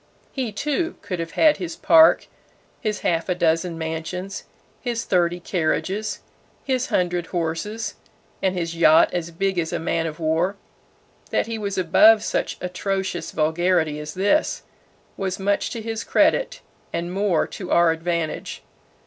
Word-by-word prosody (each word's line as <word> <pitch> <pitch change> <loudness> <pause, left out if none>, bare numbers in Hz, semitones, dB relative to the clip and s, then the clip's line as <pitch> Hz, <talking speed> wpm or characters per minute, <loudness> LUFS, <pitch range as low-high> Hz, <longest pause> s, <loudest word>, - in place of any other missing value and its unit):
He, 255 -5 -3
too, 300 - -2
could 180 -3 -4
have 165 0 -5
had 310 -2 +4
his 340 -2 -5
park, 320 0 +6 0.5
his 215 -3 -2
half 165 +1 0
a 180 - +1
dozen 165 0 +1
mansions, 165 +4 -5 0.3
his 235 -2 -2
thirty 175 -1 +1
carriages, 190 +5 -1 0.4
his 260 -2 0
hundred 175 -2 0
horses 175 +6 -3 0.5
and 190 -1 0
his 170 -1 -2
yacht 160 -1 +5
as 170 -2 -2
big 190 +2 -1
as 160 -1 -2
a - - -1
man 165 0 -1
of 155 +1 -7
war. 165 +5 +1 0.7
That - - +1
he 230 -1 -4
was 200 -2 -3
above 210 +5 +6
such - - -2
atrocious 190 0 -3
vulgarity 160 -1 +1
as 150 +3 -7
this, 205 +11 +1 0.5
was 190 -1 -2
much 200 +1 0
to 230 - -5
his 225 0 -3
credit - - +2 0.3
and 170 +1 -3
more 195 -4 +1
to 185 - -7
our 170 -1 +5
advantage. 165 -1 -3
180 Hz, 150 wpm, -23 LUFS, 165-210 Hz, 0.7 s, park